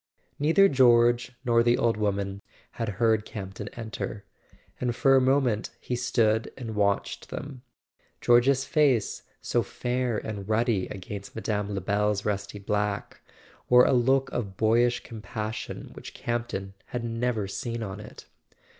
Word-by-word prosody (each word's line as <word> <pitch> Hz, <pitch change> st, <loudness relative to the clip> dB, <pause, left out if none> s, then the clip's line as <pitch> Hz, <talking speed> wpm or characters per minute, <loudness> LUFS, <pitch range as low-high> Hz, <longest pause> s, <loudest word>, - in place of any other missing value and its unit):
Neither 165 Hz, +7 st, +5 dB
George 120 Hz, -3 st, +4 dB
nor 115 Hz, -1 st, +4 dB
the 120 Hz, +1 st, +3 dB
old 115 Hz, -1 st, +2 dB
woman 100 Hz, -2 st, -2 dB, 0.3 s
had 115 Hz, -2 st, -3 dB
heard 110 Hz, -1 st, +3 dB
Camp 95 Hz, -4 st, -7 dB
ton -, -, -7 dB
enter; 110 Hz, -2 st, -6 dB, 0.5 s
and 120 Hz, -1 st, -1 dB
for 135 Hz, 0 st, +4 dB
a 135 Hz, -, +5 dB
moment 130 Hz, -4 st, +2 dB
he 125 Hz, -, -3 dB
stood 115 Hz, -3 st, +1 dB
and 115 Hz, -4 st, -5 dB
watched 100 Hz, -1 st, 0 dB
them. 140 Hz, -3 st, -7 dB, 0.6 s
George's 130 Hz, +3 st, +4 dB
face, 140 Hz, -10 st, +2 dB, 0.2 s
so -, -, +1 dB
fair 125 Hz, -2 st, -2 dB
and 105 Hz, -2 st, -5 dB
ruddy 110 Hz, -3 st, +1 dB
against 100 Hz, 0 st, -8 dB
Mme. 105 Hz, -2 st, -2 dB
Lebel's 100 Hz, +2 st, 0 dB
rusty 105 Hz, 0 st, -2 dB
black, 105 Hz, 0 st, -2 dB, 0.5 s
wore 125 Hz, 0 st, +7 dB
a -, -, +3 dB
look 135 Hz, +2 st, +3 dB
of 100 Hz, -5 st, -4 dB
boyish 120 Hz, +2 st, +3 dB
compassion 110 Hz, -1 st, -6 dB
which -, -, -10 dB
Campton 120 Hz, -5 st, -3 dB
had 120 Hz, -1 st, -4 dB
never 115 Hz, -2 st, -1 dB
seen 115 Hz, +3 st, -4 dB
on 100 Hz, 0 st, -6 dB
it. 105 Hz, -, -11 dB
115 Hz, 140 wpm, -27 LUFS, 105-125 Hz, 0.6 s, wore